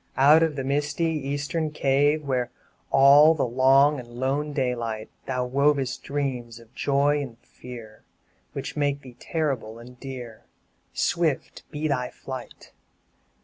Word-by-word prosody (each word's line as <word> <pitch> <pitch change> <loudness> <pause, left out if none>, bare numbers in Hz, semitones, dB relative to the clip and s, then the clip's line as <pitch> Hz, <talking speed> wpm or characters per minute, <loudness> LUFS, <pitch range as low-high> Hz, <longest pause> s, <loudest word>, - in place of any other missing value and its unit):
Out 150 +4 +7
of 160 -2 +1
the 135 - -3
misty 145 +4 0
eastern 150 +1 -2
cave, 145 +1 +2
Where, 130 -3 -1 0.4
all 145 +4 +7
the 145 - 0
long 135 +4 +4
and 120 - -9
lone 135 +5 -2
daylight, 120 -5 -2 0.2
Thou 125 0 -1
wovest 140 0 +1
dreams 125 -5 -3
of 115 +1 -19
joy 145 +2 +1
and 125 -5 -7
fear, 115 -4 -12 0.5
Which - - -5
make 145 -1 0
thee 125 -2 -12
terrible 135 -9 -2
and 125 +1 -13
dear 125 -5 -8 0.5
Swift 165 -5 -1
be 155 0 -3
thy 125 -4 -1
flight! 130 -2 -9
135 Hz, 135 wpm, -25 LUFS, 125-145 Hz, 0.5 s, Out